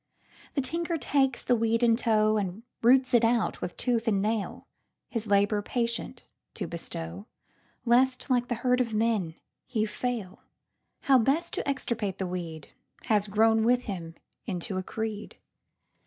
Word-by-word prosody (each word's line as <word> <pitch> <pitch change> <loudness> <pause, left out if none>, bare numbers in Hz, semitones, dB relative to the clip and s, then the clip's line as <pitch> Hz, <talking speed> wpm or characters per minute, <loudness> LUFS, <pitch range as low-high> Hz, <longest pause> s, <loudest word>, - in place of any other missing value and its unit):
The 280 - +2
tinker 335 +4 -1
takes 270 -2 +1
the 245 - +3
weed 230 +1 +1
in 230 -1 +5
tow, 215 -2 +2
And 200 +1 -3 0.2
roots 255 +2 +4
it 240 -1 +5
out 230 0 +1
with 175 - -5
tooth 235 -2 0
and 205 -3 +3
nail; 215 0 -2 0.4
His 225 -2 -3
labor 205 +1 +3
patient 235 +1 -3 0.3
to - - -3
bestow, 85 +5 -5 0.6
Lest 255 +2 +3
like 245 -2 +1
the 240 - -1
herd 250 0 +4
of 230 -3 -2
men 210 -7 0 0.3
he 220 -4 0
fail. 220 -3 -4 0.6
How 265 -2 +5
best 295 +9 +1
to - - -2
extirpate 225 -7 -2
the 190 - -2
weedHas 180 +4 -3
grown 220 +2 +4
with 245 +2 +3
him 170 -7 -6 0.3
into 185 -1 -3
a - - -4
creed. 215 +1 -5
225 Hz, 150 wpm, -28 LUFS, 200-245 Hz, 0.6 s, in